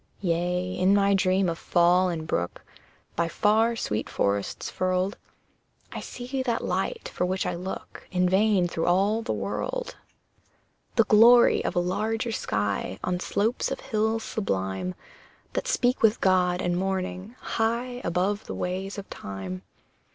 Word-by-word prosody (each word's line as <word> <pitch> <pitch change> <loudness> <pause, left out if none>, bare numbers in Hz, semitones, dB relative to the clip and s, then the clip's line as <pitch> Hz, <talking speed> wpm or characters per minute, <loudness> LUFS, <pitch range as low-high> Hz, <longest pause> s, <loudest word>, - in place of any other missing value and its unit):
Yea, 180 0 0
in 190 +2 +4
my 200 0 +4
dream 190 0 +2
of 170 -1 -2
fall 180 +2 +3
and 160 -2 -3
brook 85 - -2 0.5
By 170 0 +1
far 220 +6 +2
sweet 110 - -2
forests 100 0 -1
furled, 185 +2 0 0.8
I - - -5
see 255 +2 -5
that 240 -3 -1
light 185 +2 -2
for - - -1
which 185 +1 0
I 180 - -1
look 180 +2 -7
In 180 -1 +2
vain 190 -1 +3
through 165 -1 -2
all 200 +5 +3
the 230 - -3
world - - -3 1.0
The 230 - +6
glory 235 +3 +6
of - - -2
a - - +3
larger 220 +6 -1
sky 105 - -2
On 180 -1 -1
slopes 220 +6 0
of 270 - -3
hills 220 +1 0
sublime, 95 - -2 0.6
That - - -2
speak 250 - +1
with 225 0 +4
God 180 -1 +2
and 175 0 0
morning, 190 +3 -3
high 240 +2 -1
Above 190 +5 -1
the - - -5
ways 190 +3 -3
of 200 - -7
Time! 95 -2 -6
185 Hz, 150 wpm, -26 LUFS, 175-220 Hz, 1.0 s, The